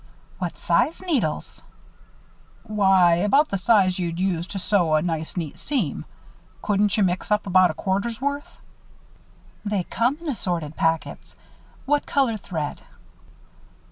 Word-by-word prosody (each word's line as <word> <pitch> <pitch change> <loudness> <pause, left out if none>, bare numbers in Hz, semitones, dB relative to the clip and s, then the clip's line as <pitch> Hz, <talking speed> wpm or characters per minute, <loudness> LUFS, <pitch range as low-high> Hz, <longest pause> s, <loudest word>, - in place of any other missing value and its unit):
"What 180 -3 -4
size 245 - +1
needles?" 265 - -2 1.0
"Why 190 -5 +4
about 240 - +3
the 195 - -2
size 190 -3 +3
you'd 170 -1 -2
use 180 -2 -1
to 200 - -6
sew 180 -5 +2
a 155 - +3
nice 160 0 -3
neat 165 -1 -4
seam. 215 - -2 0.6
Couldn't 205 0 +1
you 210 - +3
mix 180 0 -1
up 210 0 +1
about 185 -1 +5
a 155 - -4
quarter's 200 +7 -2
worth?" 285 +2 -3 1.1
"They 205 -3 -1
come 240 +9 0
in 335 - -9
assorted 175 - -3
packets. 165 0 -2 0.5
What 290 +1 +1
colored 235 -7 +1
thread?" 155 -4 -4
190 Hz, 135 wpm, -23 LUFS, 170-230 Hz, 1.1 s, about